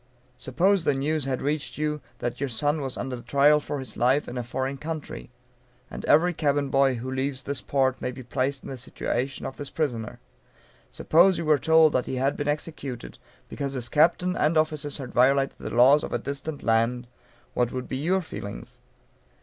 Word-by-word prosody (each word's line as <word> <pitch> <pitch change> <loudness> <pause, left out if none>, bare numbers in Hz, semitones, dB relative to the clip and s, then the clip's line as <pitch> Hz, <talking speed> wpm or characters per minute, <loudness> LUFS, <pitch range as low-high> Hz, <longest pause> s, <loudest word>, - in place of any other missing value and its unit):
Suppose 185 +8 +2
the 145 - +2
news 150 +1 -1
had 130 -2 -2
reached 145 +1 -2
you, 150 0 -2 0.2
that 120 - -4
your 140 -1 -1
son 145 +6 0
was 135 -2 -4
under 125 -2 -4
trial 140 +5 +4
for 145 - -4
his 130 -5 -7
life, 130 +5 +2
in 120 - -6
a 125 - -2
foreign 130 +3 -3
country 155 -2 -6 0.6
(and - - -7
every 175 +4 +4
cabin 145 -3 0
boy 135 -1 +3
who 125 +2 -5
leaves 130 0 -2
this 140 -2 -4
port 130 -2 0
may - - -1
be 125 +1 -9
placed 130 +3 -2
in - - -8
the 130 - -6
situation 130 +1 -3
of 135 - -6
this 145 - -5
prisoner,) 120 -9 -3 0.7
suppose 175 +3 +4
you 165 - -3
were 150 -2 +4
told 160 +2 +5
that 130 - 0
he - - -3
had 135 +2 +1
been 145 - -3
executed, 145 -4 -4 0.3
because 140 -1 -4
his 125 -3 -2
captain 175 +6 +3
and 155 +1 +2
officers 155 -2 0
had 135 -4 -7
violated 135 +2 +3
the - - -5
laws 130 +5 +5
of - - -5
a - - +1
distant 140 +4 -6
land; 115 +2 +1 0.5
what 120 -1 +1
would 130 0 -5
be 130 - -3
your 180 +6 +1
feelings? 100 -10 -8
140 Hz, 195 wpm, -26 LUFS, 130-150 Hz, 0.7 s, told